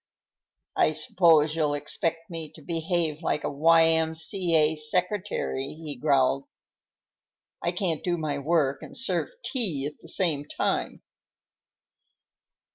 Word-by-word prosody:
"I 155 - +3
suppose 155 -1 +3
you'll 150 -3 +1
expect 165 +4 -2
me 165 -2 -6
to 155 - -13
behave 165 -1 -1
like 150 -3 -1
a - - -2
Y.M.C.A. 160 +1 +3
secretary," 165 -3 -2
he 155 -2 -6
growled. 135 0 +2 1.2
"I 170 - 0
can't 175 -4 -1
do 175 -1 0
my 150 -3 -2
work 140 -2 +1
and - - -7
serve 260 +2 0 0.2
tea 185 - +1
at 150 - -7
the - - -8
same 155 -7 +1
time." - - -2
160 Hz, 120 wpm, -26 LUFS, 150-170 Hz, 1.2 s, I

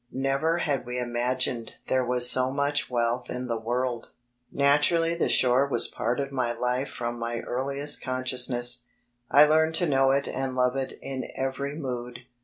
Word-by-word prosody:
Never 135 +5 0
had 140 -7 -2
we 125 0 -4
imagined 120 0 -2
there 130 0 +1
was 125 0 +4
so 130 +1 +5
much 140 +2 0
wealth 120 0 -1
in 125 0 -4
the 120 -2 -2
world. 120 +1 -2
(37I - - -16
b, - - -20 0.4
Google 140 - -3
Naturally 165 +4 +3
the 170 - -1
shore 130 +2 +4
was 120 -4 +4
a - - -18
pan 120 +4 -1
of 140 0 -3
my 125 -3 -1
life 125 +3 -2
from 120 0 -5
my 115 0 -3
earli 135 +3 -4
est 145 0 +1
consciousness. 125 -1 +1 0.4
I 145 +2 +7
learned 160 +1 +2
to 175 - +3
know 135 -3 +2
it 140 +1 +1
and 130 0 -4
love 125 0 +1
it 135 -1 -3
in 130 -1 -5
every 135 +2 -3
mood. 125 -4 -6
130 Hz, 195 wpm, -26 LUFS, 125-140 Hz, 0.4 s, I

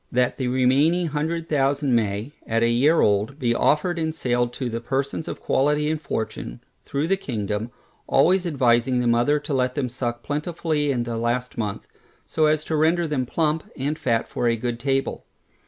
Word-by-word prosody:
That 125 +2 +1
the 130 - 0
remaining 135 +8 +3
hundred 160 +3 -2
thousand 140 -2 +1
may, 110 +2 0 0.2
at 115 +1 +1
a 115 - +3
year 140 +8 +4
old, 105 +6 +1
be 120 -5 +1
offered 165 +8 +1
in 160 -1 -1
sale 120 -5 0
to 125 +2 -5
the 115 0 -3
persons 135 +5 -2
of - - -5
quality 150 +2 +1
and 155 -1 -3
fortune, 110 - -4 0.3
through 140 +2 -1
the 195 +3 +1
kingdom, 110 - -3 0.4
always 180 +6 +3
advising 125 -4 +2
the 125 - 0
mother 120 +5 +3
to 145 - -4
let 125 -1 0
them 130 -4 -1
suck 120 -1 -4
plentifully 150 -1 -1
in 120 -3 0
the 120 -1 -4
last 120 +2 -1
month, 105 -3 -4 0.4
so 155 -1 +1
as 155 0 +1
to 160 - -2
render 165 +3 +2
them 140 -5 -1
plump, 155 +2 0
and 145 +4 -2
fat 115 -2 0
for 120 - -1
a 115 - +3
good 120 +1 -3
table. 135 +1 -1
135 Hz, 190 wpm, -23 LUFS, 120-150 Hz, 0.4 s, year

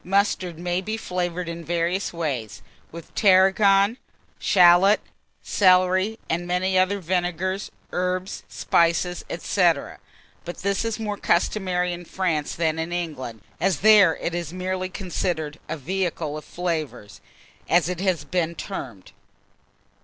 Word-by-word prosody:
Mustard 185 -3 0
may 175 +1 -1
be 215 +3 -3
flavoured 180 -3 -3
in 170 0 -6
various 175 +3 -1
ways, 130 - -4 0.3
with 165 0 -11
Tarragon, 195 +2 +4 0.4
shalot, 180 +2 +5 0.4
celery, 185 +2 +3
and 175 +2 -2
many 185 +1 0
other 185 +2 +2
vinegars, 185 +2 -2 0.2
herbs, 185 +1 -2
spices, 170 +1 +1
&c. 185 +2 -1 0.8
but 175 - -7
this 200 +2 0
is 225 -1 -3
more 210 -2 -3
customary 180 -1 0
in 175 0 -8
France 165 -5 -2
than 160 -1 0
in 165 +1 -3
England, 145 -10 -4 0.2
as 190 +1 0
there 205 -6 +7
it 170 - -3
is 170 -2 -3
merely 185 +1 -3
considered 175 -5 -3
a 160 - -3
"vehicle 165 -1 -2
of 155 - -8
flavours," 160 -12 -4 0.5
as 170 0 +4
it 180 -1 -3
has 185 -3 0
been 170 -2 -1
termed. 125 - -7
180 Hz, 130 wpm, -24 LUFS, 170-190 Hz, 0.8 s, there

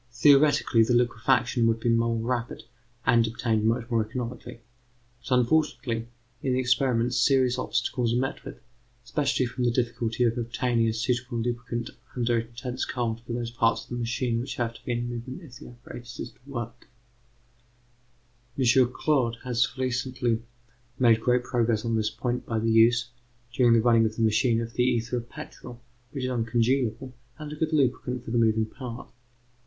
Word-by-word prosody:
Theoretically, 140 -2 +5
the 115 +2 +3
liquefaction 120 0 +2
would 115 0 +1
be 120 - 0
more 115 0 +2
rapid, 120 0 -3 0.4
and 115 0 +4
obtained 110 -1 -1
much 115 +1 +1
more 115 -2 +2
economically; 120 +1 -6 0.7
but 125 - +4
unfortunately 125 -4 0 0.3
in 130 - 0
the 130 - +1
experiment 125 -1 +1
serious 130 -2 +3
obstacles 120 -2 -1
are - - +1
met 135 +1 -3
with, - - -9 0.5
especially 130 +2 0
from 125 +1 -4
the 120 - +3
difficulty 120 -1 -1
of 120 0 +1
obtaining 115 0 0
a 110 - 0
suitable 120 +2 -1
lubricant 120 0 -3 0.2
under 120 -1 +1
intense 120 +2 -5
cold 115 -2 -2
for 120 0 -7
those 120 -1 -3
parts 115 -1 +1
of - - -20
the - - -2
machine 120 0 -1
which 120 - -4
have 115 -1 -2
to - - -15
be 120 - -1
in 120 0 -2
movement 120 +8 -6
if 125 -6 -12
the - - -11
apparatus 120 0 -11
is - - -5
to - - -29
work. 120 -3 -6 1.7
M. 130 - +1 0.3
Claude 125 -5 +1
has 125 +1 0
recently 125 -2 -1 0.6
made 115 -3 +4
great 125 +1 +2
progress 115 -3 0
on 115 -1 0
this 110 -1 +1
point 120 +3 -3
by 115 - -1
the 115 +1 +1
use, 115 +2 +4 0.4
during 120 -1 +4
the 115 - +5
running 115 -1 +4
of 110 - -6
the 115 - -1
machine, 115 +1 +2
of 115 0 -6
the 125 - +1
ether 120 -1 0
of 120 0 -6
petrol, 120 -1 -10 0.3
which 135 +1 -5
is 130 - -1
uncongealable, 120 +1 0 0.2
and 150 -1 -7
a - - -6
good 155 +1 -1
lubricant 130 -3 0
for - - -6
the 120 - +2
moving 110 -1 +3
parts. 120 +1 -9
120 Hz, 175 wpm, -26 LUFS, 115-125 Hz, 1.7 s, Theoretically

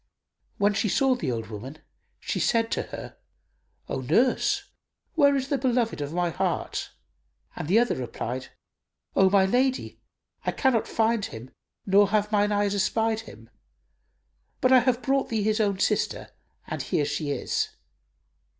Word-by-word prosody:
When 205 +1 +3
she 215 +1 0
saw 270 +6 +3
the 160 - -2
old 115 -2 -3
woman, 125 +8 -7 0.4
she - - -3
said 230 -1 +1
to - - 0
her, - - -8 0.7
"O - - -3
nurse, - - +2 0.5
where 285 -4 +4
is 270 0 -2
the 280 - 0
beloved 240 - 0
of 145 0 -4
my 175 0 0
heart?"; - - -2 0.7
and - - -5
the 190 +6 +4
other 240 +1 +3
replied, 125 +1 -4 0.7
"O 195 -1 +5
my 195 0 +4
lady, 255 +6 0 0.4
I - - -1
cannot 260 -5 +1
find 225 -1 +1
him 115 +4 -9 0.3
nor 200 0 +5
have 210 0 +1
mine 205 0 +2
eyes 205 -1 +1
espied 220 +3 +1
him, 115 +1 -15 1.1
but 255 - +3
I 255 - +9
have 245 0 0
brought 275 0 +1
thee 220 -3 0
his 215 +1 +1
own 200 -3 +1
sister; - - 0 0.4
and - - -4
here 160 -6 0
she 145 +1 -2
is." 140 - -1
205 Hz, 155 wpm, -26 LUFS, 170-240 Hz, 1.1 s, I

